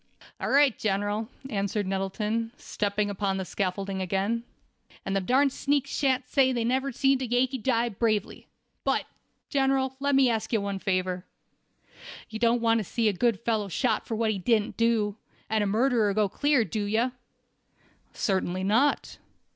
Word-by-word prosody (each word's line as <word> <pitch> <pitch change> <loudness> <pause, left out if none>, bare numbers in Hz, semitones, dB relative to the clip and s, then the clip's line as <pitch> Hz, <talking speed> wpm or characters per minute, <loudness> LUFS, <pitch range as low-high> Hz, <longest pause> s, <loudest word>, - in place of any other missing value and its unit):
"All - - -2
right, 280 -3 +5
General," 205 +2 -1 0.2
answered 200 -2 -1
Nettleton, 210 +4 -2
stepping 205 0 -2
upon 195 -1 -1
the 190 - -3
scaffolding 195 +1 -2
again. 195 +5 0 0.6
"And 195 - -1
them 195 -1 0
darn 275 +2 +4
sneaks 280 0 0
shan't 265 -2 +1
say 265 -2 +3
they 240 -2 -1
never 260 +3 0
see'd 270 +1 +2
a 255 - -2
Yankee 250 +2 +1
die 235 0 +1
bravely. 215 -1 -1 0.4
But, - - +1 0.5
General, 270 -1 +1
let 280 0 +1
me 270 -1 +5
ask 225 -2 -1
of - - -8
you 220 - +2
one 200 -1 -3
favor. 185 -1 -1 1.1
You 220 - -5
don't 235 +1 +3
want 230 0 +3
to - - -2
see 225 +3 0
a - - 0
good 230 +2 +1
fellow 220 -3 0
shot 240 +7 0
for 225 - -2
what 220 0 +1
he 200 - -3
didn't 215 +2 +1
do, 225 -3 +1 0.3
and 220 -1 +2
a - - 0
murderer 220 -1 +2
go 215 -1 +3
clear, 280 +3 +2
do 205 +3 -3
you?" 225 +5 +1 1.0
"Certainly 190 -4 -1
not." 235 +9 +1
220 Hz, 170 wpm, -27 LUFS, 200-250 Hz, 1.1 s, right